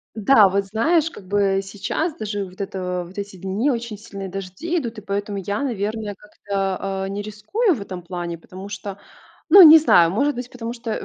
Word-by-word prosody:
Да, 215 -1 +6
вот 195 +1 0
знаешь, 310 - +1
как 195 - -13
бы, 195 -1 +1
сейчас 205 - -3
даже 205 -2 -3
вот 185 +1 -14
это 180 -2 -3
вот 185 - -15
эти 200 -1 -6
дни 195 +9 -1
очень 235 -3 -3
сильные 195 -2 -8
дожди 195 - -4
идут, 235 -6 -5
и - - -4
поэтому 200 0 -3
я, 200 +6 -3
наверное, 215 -4 -3
как-то, 195 -2 -3
э, - - -4
не 200 +1 -4
рискую 215 - 0
в 225 - -7
этом 185 -3 -7
плане, 175 -1 -5
потому 185 +4 -11
что, 200 0 -7 0.5
ну, 380 +3 +10
не 320 0 +11
знаю, 170 - +5
может 280 +9 +1
быть, 245 0 -6
потому 235 -1 -6
что, 235 -1 -6
205 Hz, 195 wpm, -22 LUFS, 195-235 Hz, 0.5 s, не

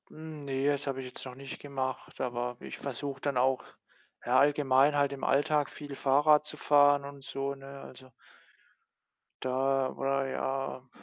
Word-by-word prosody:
Hm, 155 -1 -9
ne, 135 0 -1
das 145 -1 +1
habe 135 -1 -2
ich 130 - -5
jetzt 125 - -9
noch 130 - -7
nicht 135 0 -8
gemacht, 135 -2 -4
aber 125 -1 -2
ich - - -8
versuche 140 0 -5
dann 140 -3 -1
auch, 130 +1 +2 0.6
ja 125 +1 +3
allgemein 140 0 +4
halt 140 -1 +2
im 135 - -8
Alltag 145 0 +2
viel 145 -2 -8
Fahrrad 150 +3 +4
zu 150 - -8
fahren 145 -1 +5
und 140 -1 -10
so, 140 0 -3
ne? 135 0 -10
Also 130 0 -13 1.3
da 135 +1 +1
oder 135 0 0
ja, 135 -1 -3
135 Hz, 165 wpm, -30 LUFS, 130-145 Hz, 1.3 s, fahren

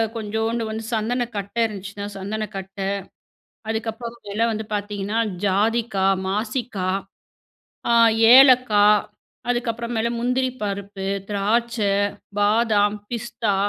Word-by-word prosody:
கொஞ்சோண்டு 225 +1 -2
வந்து 220 +1 -4
சந்தனக்கட்ட 225 -2 -2
இருந்துச்சுன்னா 200 -1 -6
சந்தனக்கட்ட. 195 -1 -5 0.9
அதுக்கப்புறம் 230 +1 -4
மேல 205 +3 -2
வந்து 220 0 -3
பார்த்தீங்கன்னா, 205 +1 -2 0.3
ஜாதிக்கா, 205 0 +1 0.2
மாசிக்கா, 210 -1 -2 1.0
ஆ - - +5 0.4
ஏலக்கா. 255 -6 +6 0.6
அதுக்கப்புறம் 235 -1 -2
மேல 225 +1 +1
முந்திரி 255 +2 +1
பருப்பு, 200 -1 -4 0.2
திராட்சை, 215 +1 +1 0.5
பாதாம், 210 0 +3
பிஸ்தா 235 -2 -1
220 Hz, 90 wpm, -22 LUFS, 200-235 Hz, 1.0 s, ஏலக்கா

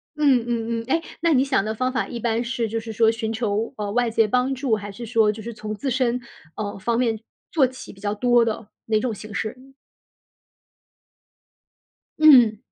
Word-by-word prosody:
嗯 275 -6 +3
嗯 230 -1 -1
嗯。 - - -9
诶， 330 +5 +1 0.2
那 335 -1 +3
你 260 -2 +4
想 270 -6 +1
的 215 +1 -2
方 255 +3 0
法 260 - -1
一 235 - -6
般 230 0 0
是 240 -1 -2
就 225 +1 -2
是 225 0 -7
说 225 +1 +4
寻 225 -1 -3
求， 220 +1 -1
呃， 205 -1 -3
外 240 +2 +1
界 225 -1 +2
帮 250 +4 +1
助， 260 -3 +1
还 205 -1 -6
是 235 +4 -8
说 220 -2 +3
就 215 +1 -8
是 235 +2 -6
从 215 -1 -6
自 265 +5 -3
身， 245 -1 0 0.3
呃， 205 -2 -4
方 230 +4 0
面 230 -3 +1 0.3
做 280 -6 +4
起， 255 0 -10
比 195 - -18
较 205 0 -1
多 240 +2 +4
的， 225 -1 -3 0.2
哪 215 -1 +2
种 240 0 -2
形 215 +1 -9
式？ 215 +5 -3 2.6
嗯。 250 -9 +7
230 Hz, 210 characters per minute, -23 LUFS, 215-250 Hz, 2.6 s, 嗯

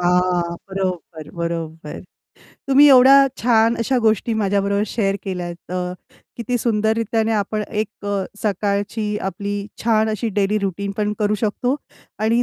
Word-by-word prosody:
हां. 180 -1 +1
बरोबर. 180 -5 -4
बरोबर. 165 -2 -4 0.7
तुम्ही 275 +2 +7
एवढ्या 265 +1 +8 0.2
छान 230 -1 +3
अशा 255 +3 +1
गोष्टी 220 +1 +2
माझ्याबरोबर 200 -1 +1
शेअर 195 -2 0
केल्यात 180 -3 -6
अ, 180 0 -2 0.4
किती 245 +1 -2
सुंदररीत्याने 225 0 0
आपण 215 0 -1
एक 215 -1 -2 0.2
अ, 200 -2 -1 0.2
सकाळची 205 +1 -1
आपली 200 +2 -4 0.2
छान 220 -1 +2
अशी 215 +2 -2
डेली 205 +2 +2
रुटीन 200 0 -3
पण 210 -1 0
करू 210 0 +1
शकतो 245 +5 0 0.4
आणि 225 +3 +2
205 Hz, 130 wpm, -20 LUFS, 185-220 Hz, 0.7 s, एवढ्या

